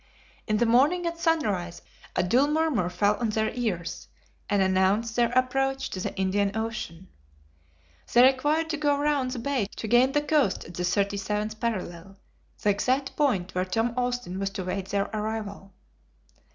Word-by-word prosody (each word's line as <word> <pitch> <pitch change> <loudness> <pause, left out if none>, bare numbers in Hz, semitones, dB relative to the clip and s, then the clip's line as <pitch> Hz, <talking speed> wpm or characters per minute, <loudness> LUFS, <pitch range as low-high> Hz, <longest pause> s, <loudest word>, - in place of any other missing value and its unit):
In 215 - +1
the 235 - +2
morning 285 +10 +3
at 335 0 -3
sunrise, 200 - 0 0.3
a - - +2
dull 250 +10 +3
murmur 300 - +1
fell 205 +3 +1
on 235 -2 -1
their 220 0 0
ears, 210 -9 -3 0.4
and 205 -1 +2
announced 190 +4 +2
their 235 -1 +2
approach 270 +1 0
to 185 - -4
the - - -3
Indian 200 +2 0
Ocean. 220 -6 -5 1.0
They 240 - +6
required 290 +5 +3
to 310 - -2
go 290 -1 +2
round 285 -3 +1
the 255 - -4
bay 240 -3 -1
to 220 - -5
gain 245 +4 +4
the 295 0 +2
coast 295 -9 +1
at 170 - -11
the 175 - -5
37th 200 +3 -1
parallel, 195 -4 -4 0.5
the 210 - +4
exact 255 +7 0
point 200 -12 0
where 185 - 0
Tom 225 +5 0
Austin 245 -7 -2
was 195 0 -1
to 195 -1 -5
wait 190 +1 -3
their 200 0 0
arrival. 210 -2 -4
220 Hz, 165 wpm, -26 LUFS, 195-265 Hz, 1.0 s, They